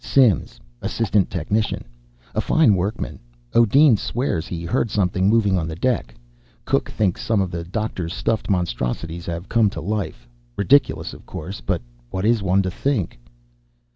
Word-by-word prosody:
Simms, 125 Hz, -, +3 dB, 0.2 s
assistant 105 Hz, -4 st, +1 dB
technician. 100 Hz, +5 st, -1 dB, 0.5 s
A 110 Hz, -, +1 dB
fine 140 Hz, -3 st, +4 dB
workman. 100 Hz, +4 st, -2 dB, 0.3 s
O'Deen 120 Hz, +2 st, +6 dB
swears 105 Hz, -, -2 dB
he 85 Hz, -1 st, -5 dB
heard 115 Hz, +6 st, 0 dB
something 95 Hz, -1 st, +1 dB
moving 105 Hz, -4 st, +3 dB
on 80 Hz, -, -2 dB
the 80 Hz, -, -5 dB
deck. 85 Hz, -, -1 dB, 0.5 s
Cook -, -, +1 dB
thinks 95 Hz, -5 st, 0 dB
some 110 Hz, -3 st, +1 dB
of 95 Hz, -2 st, 0 dB
the 85 Hz, -1 st, -4 dB
doctor's 90 Hz, -2 st, -3 dB
stuffed 110 Hz, +4 st, -1 dB
monstrosities 85 Hz, -1 st, -2 dB
have 85 Hz, +2 st, -4 dB
come 115 Hz, -3 st, +3 dB
to 85 Hz, -, -6 dB
life. 85 Hz, -, -3 dB, 0.3 s
Ridiculous, 140 Hz, +8 st, +3 dB
of -, -, -13 dB
course. 90 Hz, +6 st, -6 dB
But -, -, -1 dB, 0.3 s
what 95 Hz, +6 st, -2 dB
is 115 Hz, -1 st, +3 dB
one 95 Hz, 0 st, +2 dB
to 95 Hz, -, -2 dB
think?" 100 Hz, -, -1 dB
95 Hz, 155 wpm, -22 LUFS, 85-110 Hz, 0.5 s, O'Deen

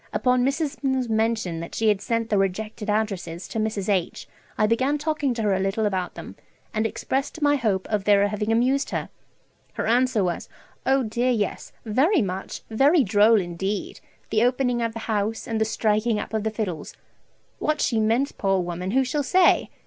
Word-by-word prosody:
Upon 250 Hz, -1 st, +2 dB
Mrs. 275 Hz, +2 st, -1 dB, 0.2 s
's 255 Hz, -2 st, -2 dB
mentioning 220 Hz, -6 st, 0 dB
that 170 Hz, -, -7 dB
she 220 Hz, -1 st, +2 dB
had 205 Hz, -2 st, +1 dB
sent 230 Hz, 0 st, -2 dB
the 205 Hz, -, +3 dB
rejected 210 Hz, +2 st, -2 dB
addresses 195 Hz, -5 st, -2 dB
to 225 Hz, -, -3 dB
Mrs. 215 Hz, -3 st, -2 dB
H., 190 Hz, -5 st, -1 dB, 0.3 s
I 215 Hz, -, +3 dB
began 260 Hz, +7 st, +1 dB
talking 295 Hz, -2 st, -1 dB
to 225 Hz, -, -2 dB
her 205 Hz, -2 st, +2 dB
a 190 Hz, -, 0 dB
little 195 Hz, +3 st, 0 dB
about 185 Hz, -3 st, -2 dB
them, -, -, -9 dB, 0.4 s
and 220 Hz, 0 st, +1 dB
expressed 270 Hz, +6 st, -3 dB
my 290 Hz, 0 st, +4 dB
hope 210 Hz, -8 st, 0 dB
of 210 Hz, -2 st, -1 dB
their 205 Hz, 0 st, +4 dB
having 210 Hz, +1 st, -2 dB
amused 255 Hz, +5 st, +2 dB
her. -, -, -3 dB, 0.6 s
Her -, -, -3 dB
answer 240 Hz, -2 st, +2 dB
was, 175 Hz, -1 st, -3 dB, 0.4 s
"Oh 265 Hz, 0 st, +3 dB
dear 240 Hz, +3 st, 0 dB
yes, 215 Hz, -5 st, -1 dB
very 270 Hz, -, +3 dB
much, 190 Hz, 0 st, -5 dB
very 280 Hz, +7 st, +4 dB
droll 210 Hz, +1 st, +5 dB
indeed, 190 Hz, +3 st, -3 dB, 0.3 s
the 215 Hz, -, +3 dB
opening 245 Hz, -1 st, +1 dB
of 230 Hz, -1 st, -1 dB
the 230 Hz, -, -6 dB
house, 220 Hz, 0 st, -2 dB
and 225 Hz, -1 st, -1 dB
the -, -, +4 dB
striking 215 Hz, +1 st, +1 dB
up 210 Hz, -, -5 dB
of 220 Hz, -1 st, 0 dB
the 220 Hz, -, 0 dB
fiddles!" 200 Hz, -8 st, -4 dB, 0.6 s
What 305 Hz, 0 st, 0 dB
she 225 Hz, -, +1 dB
meant, 230 Hz, +6 st, +1 dB
poor 195 Hz, -1 st, +2 dB
woman, 180 Hz, +1 st, -3 dB
who 265 Hz, +6 st, +3 dB
shall 265 Hz, +3 st, -1 dB
say? 365 Hz, +6 st, +3 dB
220 Hz, 190 wpm, -24 LUFS, 200-250 Hz, 0.6 s, droll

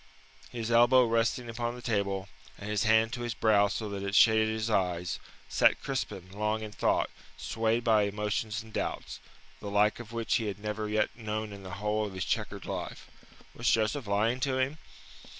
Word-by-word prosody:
His 115 Hz, -1 st, -4 dB
elbow 120 Hz, +2 st, +6 dB
resting 115 Hz, +1 st, +1 dB
upon 120 Hz, +1 st, -3 dB
the 125 Hz, -, -9 dB
table, 100 Hz, -4 st, -1 dB, 0.3 s
and 100 Hz, -, -8 dB
his 105 Hz, 0 st, 0 dB
hand 110 Hz, +1 st, +4 dB
to 120 Hz, -, -4 dB
his 120 Hz, -1 st, -3 dB
brow 105 Hz, -2 st, +4 dB
so 105 Hz, +2 st, -3 dB
that 100 Hz, -1 st, -4 dB
it 100 Hz, +1 st, -2 dB
shaded 110 Hz, -1 st, +6 dB
his 110 Hz, 0 st, -2 dB
eyes, 90 Hz, -5 st, 0 dB, 0.3 s
sat -, -, +4 dB
Crispin 95 Hz, 0 st, -4 dB
long 105 Hz, +2 st, -1 dB
in 105 Hz, -, -6 dB
thought, -, -, +1 dB, 0.3 s
swayed 115 Hz, +1 st, 0 dB
by 110 Hz, -3 st, +4 dB
emotions 105 Hz, +2 st, -2 dB
and 110 Hz, -1 st, -15 dB
doubts, -, -, -3 dB, 0.4 s
the 100 Hz, -, -6 dB
like 105 Hz, +2 st, +2 dB
of 120 Hz, -1 st, -9 dB
which 115 Hz, +1 st, 0 dB
he 115 Hz, -4 st, -2 dB
had 100 Hz, -, -3 dB
never 105 Hz, 0 st, -4 dB
yet 110 Hz, 0 st, 0 dB
known 110 Hz, -2 st, -4 dB
in 100 Hz, -, -9 dB
the 95 Hz, 0 st, -7 dB
whole 105 Hz, +1 st, 0 dB
of 95 Hz, -, -9 dB
his 95 Hz, -, -2 dB
chequered -, -, -2 dB
life. -, -, -6 dB, 0.4 s
Was 115 Hz, -, 0 dB
Joseph 110 Hz, +3 st, +1 dB
lying 110 Hz, +5 st, +1 dB
to 130 Hz, 0 st, 0 dB
him? 135 Hz, +4 st, -1 dB
110 Hz, 190 wpm, -30 LUFS, 105-115 Hz, 0.4 s, elbow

